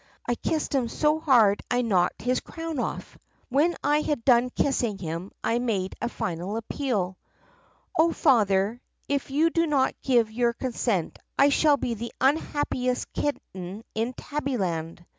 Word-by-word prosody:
I 240 - +1
kissed 310 +6 -2
him 260 -4 +1
so 300 +5 +1
hard 235 -10 +4
I 245 0 +1
knocked 185 -6 +1
his 250 +1 +1
crown 325 -3 -5
off. - - -4 0.3
"When 295 +7 +2
I 295 +2 +3
had 290 -6 -2
done 250 -1 +5
kissing 245 -6 0
him 170 +1 -5
I 235 - +1
made 205 -6 -1
a 235 - -1
final 180 +1 -3
appeal: 220 -6 -2 0.8
'O 330 +1 +5
Father, 215 - +2 0.3
if 280 -1 -1
you 310 +5 +2
do 335 0 +2
not 275 -3 +2
give 235 -4 +2
your 235 +1 +1
consent 230 -8 -2 0.2
I 280 - +6
shall 290 +1 +4
be 245 - -2
the 230 +1 -5
un 270 +4 +4
happiest 255 -5 -2
kitten 195 -8 -4
in 230 +3 -1
Tabbyland! 185 - -3
245 Hz, 155 wpm, -26 LUFS, 205-285 Hz, 0.8 s, I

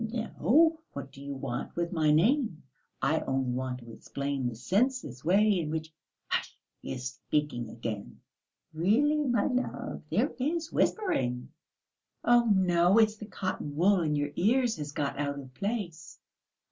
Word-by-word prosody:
"No; 245 +8 +2
what 140 -1 -7
do 135 - -13
you 140 0 -5
want 130 -3 -4
with 170 0 -1
my 160 -4 +2
name?... 195 - +3 0.4
I 155 +4 +3
only 130 -1 -1
want 130 0 -3
to 115 0 -11
explain 140 +1 -3
the 120 - -7
senseless 185 - 0
way 200 +3 +4
in 155 -3 -2
which...." 160 0 -4 0.3
"Hush... - - -2 0.2
he - - -6
is 125 -1 -6
speaking 140 -1 -2
again...." 110 -3 -6 0.5
"Really, 225 - +3
my 245 -6 +2
love, 255 -1 -2
there - - +1
is 320 +5 -1
whispering." 125 - 0 0.7
"Oh, 240 0 +5
no, 180 0 +4
it's 215 -1 +4
the 210 - -8
cotton 185 -7 -4
wool 185 +4 +4
in 150 -2 +1
your 145 0 -1
ears 235 +3 +2
has 150 -1 -5
got 140 -1 -2
out 140 -1 -1
of 130 -2 -9
place." 200 - -4
165 Hz, 155 wpm, -29 LUFS, 140-220 Hz, 0.7 s, Oh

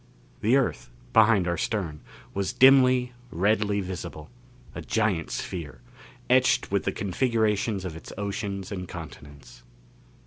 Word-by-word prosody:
The 115 +4 +3
Earth, 135 - -1 0.2
behind 110 -5 +5
our 85 -1 0
stern, 90 -9 -2 0.3
was 100 -1 -2
dimly, 130 -2 +5 0.2
redly 100 +2 +1
visible 85 -3 -7 0.4
a - - -6
giant 105 -7 0
sphere, 85 -5 -5 0.5
etched 130 -4 +3
with 100 -1 0
the 95 - +1
configurations 105 0 0
of 85 -3 -5
its 80 - -10
oceans 100 -1 -4
and 90 -2 -5
continents. 75 -6 -11
100 Hz, 125 wpm, -26 LUFS, 90-110 Hz, 0.5 s, behind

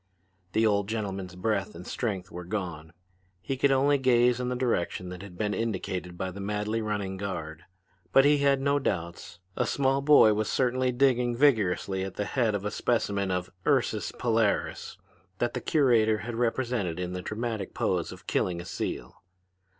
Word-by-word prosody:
The 110 - +3
old 100 -1 +1
gentleman's 95 -5 -4
breath 105 +1 -1
and 85 +2 -9
strength 95 -6 -3
were 90 +1 -7
gone. 85 -5 -5 0.5
He 135 - -3
could 135 +1 +2
only 140 +1 +3
gaze 125 -1 +3
in 125 0 -2
the 125 - -1
direction 105 -7 -1
that 90 0 -8
had 95 -3 -11
been 105 +1 -1
indicated 95 -4 -3
by 95 +1 -3
the 100 - -9
madly 105 +2 -2
running 105 -3 -3
guard; 85 -5 -5 0.5
but 135 +5 +6
he 145 0 +5
had 140 -1 +3
no 140 +1 +2
doubts. 85 -7 -4 0.2
A - - 0
small 135 0 +1
boy 140 -7 +7
was 105 0 -1
certainly 130 0 +1
digging 125 -1 +2
vigorously 100 -8 +2
at 95 -1 -6
the 105 - -2
head 115 -4 +1
of 100 0 -4
a 105 - -1
specimen 100 -5 0
of 90 -1 -2 0.2
Ursus - - +1
Polaris 115 -3 0 0.4
that 120 +2 -1
the - - -3
curator 115 -8 +3
had 120 - -4
represented 115 -6 -1
in 90 0 -3
the 90 - -4
dramatic 110 0 -4
pose - - 0
of - - -12
killing 90 -2 0
a 85 - -7
seal. 95 - -5
105 Hz, 175 wpm, -28 LUFS, 95-125 Hz, 0.5 s, boy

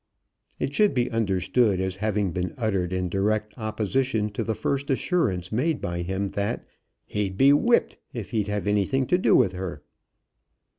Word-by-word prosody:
It 135 - -2
should 210 +3 +3
be 125 0 +1
understood 100 -1 +1
as 95 0 -2
having 105 -2 0
been 90 +1 -3
uttered 100 -7 0
in 90 0 -1
direct 105 +3 -1
opposition 110 0 -1
to 105 - -3
the 110 - -2
first 140 +5 -2
assurance 125 - 0
made 140 +8 0
by 85 0 -3
him, 95 +3 -2
that 100 +1 -2 0.4
"He'd 100 -2 -2
be 140 +4 +6
whipped 235 +11 +2
if 115 -5 -6
he'd 105 -3 0
have 105 -3 -2
anything 105 +6 +1
to 180 +7 +2
do - - +4
with 95 - +4
her." 90 -5 -6
105 Hz, 165 wpm, -25 LUFS, 95-125 Hz, 0.4 s, be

